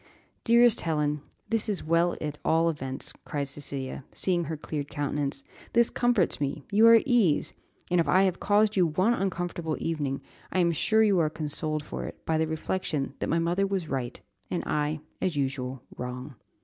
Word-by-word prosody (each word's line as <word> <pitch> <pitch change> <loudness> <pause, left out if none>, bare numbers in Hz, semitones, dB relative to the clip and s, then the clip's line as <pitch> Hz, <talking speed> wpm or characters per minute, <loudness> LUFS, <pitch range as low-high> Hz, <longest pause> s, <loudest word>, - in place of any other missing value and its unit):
"Dearest 235 -1 +5
Helen, 150 -2 0 0.3
this 225 -1 0
is 205 - -2
well 170 +2 +2
at 150 -1 -4
all 165 +1 +3
events," 135 -4 -5
cried 140 -1 -3
Cecilia, 140 -1 -5
seeing 175 -3 0
her 160 +1 -4
cleared 145 -1 -5
countenance. 145 -1 -2 0.3
"This 235 0 +4
comforts 240 -11 +1
me; 140 +1 -2
you 215 +3 +6
are 230 - +9
at 225 - +5
ease; 230 - +2 0.4
and, 180 - +4
if - - -2
I 190 +1 +5
have 185 -2 +1
caused 210 +1 +3
you 180 -3 +4
one 185 +9 +2
uncomfortable 175 -5 -2
evening, 145 -4 -2 0.3
I - - -2
am 175 -2 +4
sure 220 +7 +3
you 200 -4 +4
are 155 -2 +2
consoled 155 0 -3
for - - -5
it - - -9
by 160 -1 +1
the 160 - +1
reflection 155 -3 -2
that - - -2
my 165 - +2
mother 175 +4 +1
was 190 -5 -2
right, 130 -3 -3 0.3
and - - -2
I, 150 0 -1 0.2
as 180 -4 0
usual, 130 -2 -2
wrong. 125 +3 -6
160 Hz, 185 wpm, -28 LUFS, 145-190 Hz, 0.4 s, are